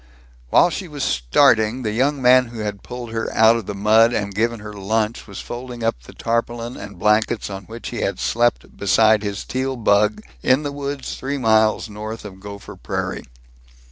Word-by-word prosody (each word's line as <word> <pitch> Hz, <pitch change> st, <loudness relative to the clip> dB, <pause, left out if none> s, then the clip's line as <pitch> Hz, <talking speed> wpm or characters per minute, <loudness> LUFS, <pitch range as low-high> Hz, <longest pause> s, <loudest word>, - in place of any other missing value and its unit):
While 175 Hz, -, +5 dB
she 190 Hz, -, -4 dB
was 145 Hz, -4 st, -5 dB
starting 110 Hz, -, +3 dB
the 110 Hz, -, -1 dB
young 135 Hz, +4 st, 0 dB
man 125 Hz, +1 st, +6 dB
who 115 Hz, -2 st, -8 dB
had 105 Hz, -2 st, -4 dB
pulled 120 Hz, -2 st, -7 dB
her 115 Hz, 0 st, -3 dB
out 110 Hz, +1 st, +6 dB
of 115 Hz, -4 st, -4 dB
the 105 Hz, -, -4 dB
mud 110 Hz, +3 st, +4 dB
and 100 Hz, -3 st, -2 dB
given 115 Hz, +3 st, 0 dB
her 105 Hz, 0 st, -8 dB
lunch 110 Hz, +3 st, -2 dB
was 100 Hz, -3 st, -7 dB
folding 120 Hz, -1 st, -7 dB
up 115 Hz, -, -1 dB
the 60 Hz, -, -14 dB
tarpaulin 115 Hz, +1 st, -2 dB
and 100 Hz, -2 st, -9 dB
blankets 105 Hz, +2 st, +1 dB
on 95 Hz, 0 st, -7 dB
which 115 Hz, +3 st, -8 dB
he -, -, -6 dB
had -, -, -1 dB
slept 120 Hz, +1 st, 0 dB
beside 110 Hz, +2 st, +4 dB
his 100 Hz, -2 st, -4 dB
Teal 130 Hz, +1 st, -2 dB
bug, 105 Hz, -1 st, +2 dB, 0.2 s
in 130 Hz, +4 st, +3 dB
the 145 Hz, -, -3 dB
woods 140 Hz, -1 st, -5 dB
three 140 Hz, +2 st, -3 dB
miles 110 Hz, -3 st, +3 dB
north 110 Hz, +1 st, -7 dB
of 95 Hz, -2 st, -10 dB
Gopher 100 Hz, 0 st, -9 dB
Prairie. -, -, -4 dB
110 Hz, 190 wpm, -21 LUFS, 105-125 Hz, 0.2 s, man